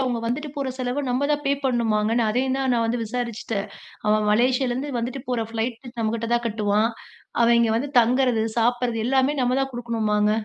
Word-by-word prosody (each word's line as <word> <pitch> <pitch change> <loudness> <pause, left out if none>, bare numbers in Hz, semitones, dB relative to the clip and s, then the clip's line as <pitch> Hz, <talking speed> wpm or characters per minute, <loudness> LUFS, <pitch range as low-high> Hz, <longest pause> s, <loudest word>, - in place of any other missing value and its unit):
அவுங்க 250 -3 0
வந்துட்டு 280 +6 -2
போற 275 -2 -2
செலவு 255 +2 -1
நம்ப 255 +3 +1
தான் 295 0 -1
பே 275 - +3
பண்ணுமாங்க. 225 -4 +1
நான் 220 -2 +2
அதையும் 260 +3 0
தான் 265 -1 0
நான் 230 - +1
வந்து 235 +1 -1
விசாரிச்சுட்டேன். 225 -3 -3 0.4
அவன் 210 0 +2
மலேசியாலருந்து 255 +4 +1
வந்துட்டு 245 +3 -4
போற 245 -3 0
ஃப்ளைட்டு 235 +2 -4
நம்மக்கிட்ட 225 +1 -1
தான் 240 0 0
கட்டுவான். 210 0 +1 0.5
அவன் 235 0 +5
இங்கே 225 -1 +2
வந்து 275 +5 -2
தங்குறது 245 -1 +2 0.2
சாப்பிட்றது 240 -1 +1
எல்லாமே 270 +2 +2
நம்ம 250 +2 +1
தான் 270 - -3
குடுக்கணுமாங்க. 215 -3 0
240 Hz, 180 wpm, -23 LUFS, 225-255 Hz, 0.5 s, அவன்